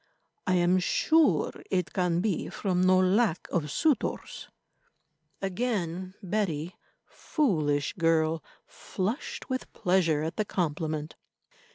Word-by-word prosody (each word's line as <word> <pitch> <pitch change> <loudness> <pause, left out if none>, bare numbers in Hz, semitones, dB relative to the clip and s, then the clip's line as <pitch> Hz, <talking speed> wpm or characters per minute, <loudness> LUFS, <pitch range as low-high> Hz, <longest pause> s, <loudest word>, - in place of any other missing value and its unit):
I 185 - +3
am 180 +1 +3
sure 315 - +3 0.2
it 180 -2 -1
can 175 -2 +1
be 195 -5 -1
from 185 -3 -1
no 185 0 +5
lack 185 0 +2
of 155 -4 0
suitors." 290 - -1 0.9
Again 190 -3 -2
Betty, 180 -4 -2 0.3
foolish 155 - 0
girl, 165 -2 +1 0.2
flushed 210 +9 -4
with 260 -1 -4
pleasure 170 -5 +2
at 160 - -4
the 215 - +1
compliment. 155 -4 -2
180 Hz, 105 wpm, -28 LUFS, 160-200 Hz, 0.9 s, no